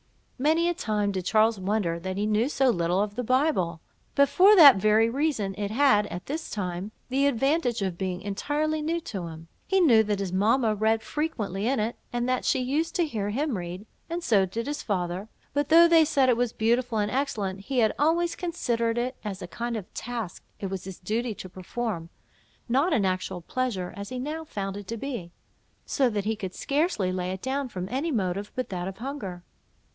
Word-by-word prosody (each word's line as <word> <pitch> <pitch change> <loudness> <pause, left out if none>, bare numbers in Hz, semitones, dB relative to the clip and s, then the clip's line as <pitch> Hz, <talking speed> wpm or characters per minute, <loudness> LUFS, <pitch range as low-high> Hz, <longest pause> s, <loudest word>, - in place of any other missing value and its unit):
Many 320 +5 +3
a 345 - +2
time 210 - -1
did 185 -2 -3
Charles 220 0 +3
wonder 185 -3 0
that 190 +2 -4
he 205 - 0
knew 215 +4 +2
so 270 -3 +3
little 175 -1 0
of 205 -1 -4
the 250 +3 -3
Bible; 255 - +1 0.4
but 280 0 +5
for 395 +7 +6
that 290 - +10
very 215 +3 +4
reason, 240 -6 0
it 205 0 -3
had, 220 -3 +4
at 180 -2 -7
this 315 +4 -4
time, 185 0 -4 0.2
the 275 +2 +2
advantage 270 -3 +1
of 185 -3 -3
being 185 -1 -2
entirely 295 +10 -1
new 330 +3 -1
to 190 - -5
him. 165 0 -10 0.2
He 385 - +3
knew 250 -11 +6
that 210 -1 0
his 195 -2 -3
mamma 220 +4 +3
read 220 +1 +1
frequently 225 - -2
in 265 0 +1
it; 220 +3 -1 0.2
and 240 0 -1
that 255 0 0
she - - +3
used 285 +6 -1
to 345 - +2
hear 215 -9 -3
him 275 +4 -1
read, 180 +2 -6 0.2
and 340 +1 -3
so 200 - +3
did 230 +5 -4
his 295 +1 -3
father; 185 -1 -2 0.3
but 285 0 0
though 335 +2 +8
they 330 -1 +6
said 285 -4 +2
it 240 - +3
was 245 -1 +1
beautiful 235 +1 +1
and 210 0 0
excellent, 210 -8 -1
he 255 +7 -4
had 220 -3 +4
always 335 +3 +2
considered 240 -10 -1
it 250 +2 -1
as 195 -3 -5
a - - -6
kind 235 +5 -3
of 200 - -9
task 230 -6 -5 0.2
it 195 -2 -4
was 190 -2 -4
his 190 -2 -7
duty 220 +4 -2
to 185 - -8
perform, 185 -1 -4 0.6
not 275 +9 +2
an 220 -10 +2
actual 185 -1 -2
pleasure, 200 -3 -2
as 200 0 -6
he 255 - -5
now 305 +5 -4
found 195 -9 -4
it 205 -2 -8
to 230 - -4
be; 230 -9 -5 0.5
so 265 -4 +2
that 205 -3 -2
he 220 +1 0
could 190 -3 -6
scarcely 280 - 0
lay 180 0 -2
it 190 0 -6
down, 270 0 -1
from 185 -4 -5
any 285 +6 -1
motive 200 -3 -1
but 255 - -3
that 180 -1 -3
of 190 - -6
hunger. 220 -9 -6
225 Hz, 210 wpm, -27 LUFS, 195-275 Hz, 0.6 s, that